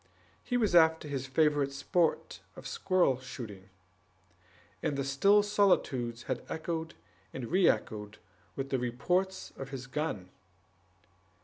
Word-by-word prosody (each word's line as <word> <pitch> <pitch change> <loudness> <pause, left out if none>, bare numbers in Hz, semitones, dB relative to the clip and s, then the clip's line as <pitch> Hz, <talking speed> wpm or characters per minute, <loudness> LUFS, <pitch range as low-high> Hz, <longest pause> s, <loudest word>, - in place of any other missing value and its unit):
He 245 - 0
was 215 -6 +1
after 160 -2 +5
his 135 -2 -3
favorite 145 0 +2
sport 160 +4 0 0.2
of - - -11
squirrel 185 - +1
shooting, 105 -7 -9 1.1
and 140 - -1
the 140 - 0
still 195 +10 +4
solitudes 130 - +1
had 130 - -3
echoed 160 0 -4 0.4
and 125 0 -5
re 185 0 +5
echoed 105 -1 -2 0.4
with 135 0 -4
the 130 - +1
reports 180 +11 -1
of 135 0 -6
his 135 -2 -6
gun. 130 - -3
140 Hz, 125 wpm, -31 LUFS, 130-175 Hz, 1.1 s, after